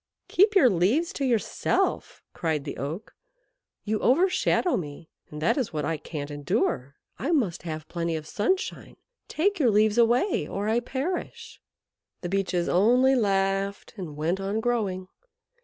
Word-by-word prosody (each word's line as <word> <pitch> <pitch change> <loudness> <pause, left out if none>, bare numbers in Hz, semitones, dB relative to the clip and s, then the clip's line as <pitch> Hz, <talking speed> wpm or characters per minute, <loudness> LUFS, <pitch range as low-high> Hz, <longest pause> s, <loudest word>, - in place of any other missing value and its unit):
"Keep 410 +3 +3
your 350 -10 +7
leaves 225 - +2
to 280 - -3
yourself," 235 -5 -1
cried 160 -4 -1
the 145 - -6
Oak; 150 - -5 0.7
"you 215 0 -1
overshadow 355 +4 +2
me, 155 -1 -6 0.2
and 150 - -8
that 170 - +2
is 250 -10 -2
what 150 - -2
I 165 - -1
can't 145 -2 -6
endure. 140 -2 -1 0.2
I 270 - -2
must 225 - +1
have 155 -2 -6
plenty 170 -1 -2
of 155 -1 -5
sunshine. 240 - -2 0.3
Take 390 +4 0
your 260 -6 +4
leaves 215 +1 +3
away 240 - +2
or 200 +2 -3
I 225 +2 +2
perish." 360 - -5 0.6
The 175 - -4
Beeches 190 -2 0
only 245 +8 +4
laughed 195 -2 0
and 170 -8 -7
went 165 +5 -1
on 195 +3 -2
growing. 210 -6 -1
200 Hz, 150 wpm, -26 LUFS, 170-255 Hz, 0.7 s, your